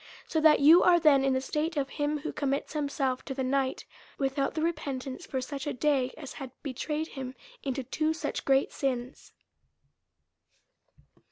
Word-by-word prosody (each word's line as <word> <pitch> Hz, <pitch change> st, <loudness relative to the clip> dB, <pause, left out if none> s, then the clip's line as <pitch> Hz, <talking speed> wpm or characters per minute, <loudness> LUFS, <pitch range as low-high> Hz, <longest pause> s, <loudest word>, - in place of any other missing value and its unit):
So 320 Hz, -, 0 dB
that 310 Hz, -1 st, +6 dB
you 320 Hz, +5 st, +8 dB
are 350 Hz, -1 st, +6 dB
then 295 Hz, -4 st, +5 dB
in 270 Hz, -1 st, +2 dB
the 260 Hz, -, +1 dB
state 305 Hz, +4 st, -2 dB
of 275 Hz, -1 st, 0 dB
him 295 Hz, +1 st, -1 dB
who 295 Hz, -, -5 dB
commits 280 Hz, 0 st, -2 dB
himself 280 Hz, -3 st, -1 dB
to 270 Hz, -, -5 dB
the 265 Hz, -, -1 dB
night 265 Hz, 0 st, 0 dB, 0.3 s
without 275 Hz, +1 st, -1 dB
the 315 Hz, -, -1 dB
repentance 275 Hz, -5 st, -3 dB
for 260 Hz, -, -2 dB
such 275 Hz, +2 st, -5 dB
a 290 Hz, -, -1 dB
day, 270 Hz, -2 st, +1 dB
as 280 Hz, -4 st, -8 dB
had 270 Hz, -2 st, -7 dB
betrayed 300 Hz, +3 st, -3 dB
him 265 Hz, -2 st, -6 dB, 0.3 s
into 270 Hz, -1 st, -3 dB
two 310 Hz, +5 st, 0 dB
such 320 Hz, -, -3 dB
great 270 Hz, 0 st, +3 dB
sins. 255 Hz, -2 st, -3 dB
275 Hz, 170 wpm, -29 LUFS, 265-300 Hz, 0.3 s, you